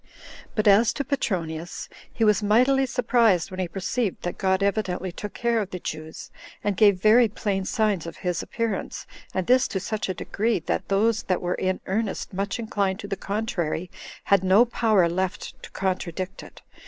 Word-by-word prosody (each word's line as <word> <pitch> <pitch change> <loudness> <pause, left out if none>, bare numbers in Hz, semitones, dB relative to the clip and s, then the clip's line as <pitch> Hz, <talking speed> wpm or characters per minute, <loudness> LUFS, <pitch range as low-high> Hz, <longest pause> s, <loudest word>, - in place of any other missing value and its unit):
But 215 -1 +1
as 205 +3 +6
to 280 - -2
Petronius, 170 - -3 0.2
he 230 - -1
was 210 0 +4
mightily 255 +6 +3
surprised 230 -8 +2
when 185 - -6
he 185 - 0
perceived 195 +4 -2
that 175 - -4
God 190 0 +2
evidently 190 -3 -1
took 205 +4 -7
care 235 -1 +1
of 200 - -4
the 185 - -5
Jews, 155 -1 -7 0.3
and 205 -1 0
gave 200 -2 +5
very 225 +4 +6
plain 200 -3 -2
signs 210 -6 0
of 165 - -8
his 180 -1 0
appearance, 230 -4 -3 0.3
and 185 -1 -2
this 255 +1 +4
to 190 - -3
such 215 +1 -3
a 185 - -1
degree, 225 +6 0
that - - -2
those 215 +2 +2
that 185 - +2
were 175 0 -1
in 185 0 -1
earnest 205 +1 -2
much 195 +2 -2
inclined 200 -4 -1
to 200 - -7
the 200 - -2
contrary 185 -5 -3 0.3
had 200 -2 +3
no 190 +6 +6
power 220 -6 +3
left 185 +2 -3
to - - -10
contradict 185 0 -3
it. - - -14
200 Hz, 180 wpm, -25 LUFS, 185-220 Hz, 0.3 s, as